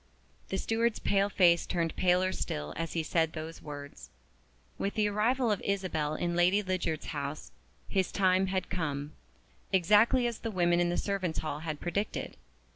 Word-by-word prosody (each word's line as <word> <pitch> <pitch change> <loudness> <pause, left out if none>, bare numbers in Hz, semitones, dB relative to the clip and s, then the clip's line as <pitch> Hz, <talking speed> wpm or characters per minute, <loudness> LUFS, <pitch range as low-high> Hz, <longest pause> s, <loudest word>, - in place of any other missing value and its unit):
The 190 - -1
steward's 225 +3 0
pale 200 0 +1
face 175 -3 +4
turned 165 -2 -1
paler 185 +1 +3
still 75 - -4
as 165 0 -3
he 165 - 0
said 160 0 +1
those 160 0 -7
words. 145 -1 -9 0.7
With 200 - -2
the 215 -2 +2
arrival 225 +4 +1
of 205 - 0
Isabel 180 -7 -1
in 175 +1 -1
Lady 180 +4 +3
Lydiard's 185 -5 -2
house 145 0 -5 0.4
"his 190 -2 0
time 190 -1 +3
had 185 -1 -2
come" 150 -5 -3 0.6
exactly 210 +7 +4
as 235 -2 -2
the 230 - -3
women 175 -3 +2
in 175 0 +2
the 175 - -1
servants' 190 -5 -1
hall 150 -1 -3
had 155 -2 -4
predicted. 200 +4 -3
180 Hz, 165 wpm, -30 LUFS, 160-200 Hz, 0.7 s, face